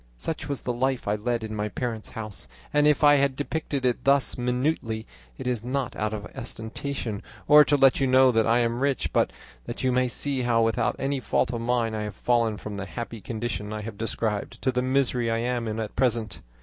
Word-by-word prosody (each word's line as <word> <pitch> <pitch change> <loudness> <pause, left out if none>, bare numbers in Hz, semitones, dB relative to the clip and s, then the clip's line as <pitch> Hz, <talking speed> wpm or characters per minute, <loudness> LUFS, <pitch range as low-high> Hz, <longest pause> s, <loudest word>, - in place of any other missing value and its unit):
Such 150 - -4
was 140 - -2
the 125 - -2
life 130 0 -1
I 105 - +2
led 115 +2 -1
in 110 0 -5
my 105 0 -2
parents' 110 +2 -4
house 105 -9 -5 0.3
and 150 0 +4
if 150 +1 +3
I 145 0 +7
have 140 -1 +2
depicted 145 -1 -3
it 125 -1 +1
thus 140 0 +4
minutely, 125 -3 -1 0.3
it - - -7
is 125 -3 -1
not 130 0 -2
out 105 0 -1
of 105 -1 -5
ostentation, 115 -2 -4 0.3
or 150 0 +9
to 145 - +3
let 135 -1 +5
you 135 - +2
know 130 0 +6
that 115 -2 +2
I 115 +2 +4
am 115 0 0
rich, 140 0 0
but - - +3 0.4
that - - -5
you 130 - +3
may 125 0 +2
see 135 +2 0
how, 120 -2 +3
without 115 0 +1
any 135 0 -1
fault 125 - 0
of 115 - -3
mine, 115 -1 0
I 110 - -2
have 105 0 -5
fallen 115 -3 +1
from 105 -1 -6
the 100 0 -5
happy 115 0 -6
condition 110 -1 -4
I 110 0 -4
have 110 0 -6
described, 110 -2 -2
to 130 - +2
the 125 0 0
misery 130 -2 +1
I 115 - +1
am 120 0 -1
in 110 +1 -3
at 110 -2 -4
present. 115 - 0
120 Hz, 225 wpm, -26 LUFS, 110-130 Hz, 0.4 s, or